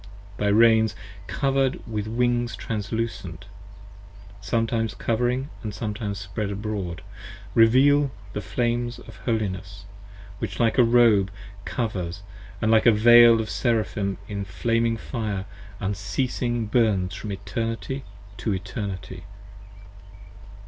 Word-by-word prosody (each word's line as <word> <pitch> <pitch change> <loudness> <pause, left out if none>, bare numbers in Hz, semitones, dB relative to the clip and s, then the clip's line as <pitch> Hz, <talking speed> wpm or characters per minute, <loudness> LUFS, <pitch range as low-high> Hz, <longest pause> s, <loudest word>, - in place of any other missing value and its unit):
Thy 105 - 0
Reins 110 +1 +5 0.3
cover'd 135 -1 +1
with 110 -2 -3
Wings 120 +1 0
translucent, 100 -5 -4 1.0
sometimes 115 +1 0
covering 125 +6 -1
And 105 -3 -5
sometimes 105 -1 -3
spread 100 +2 -4
abroad, 100 -4 -4 0.5
reveal 135 +5 +5 0.2
the 105 - -3
flames 120 +4 -1
of - - -13
holiness, 100 -4 -3 0.5
Which 100 -4 -4
like 115 +2 +2
a - - +8
robe 115 -5 +5 0.4
covers, 100 -5 -3 0.2
& 100 0 -17
like 110 +1 +4
a - - +9
Veil 120 +1 +7
of 110 - -2
Seraphim 110 -5 0
25 105 - -13
In - - -2
flaming 115 +3 0
fire 105 -5 -4 0.3
unceasing 110 +4 -1
burns 105 -5 +1
from 100 +1 -6
Eternity 115 +5 -4 0.3
to 95 +2 -1
Eternity. 95 -2 -6
110 Hz, 110 wpm, -25 LUFS, 100-120 Hz, 1.0 s, a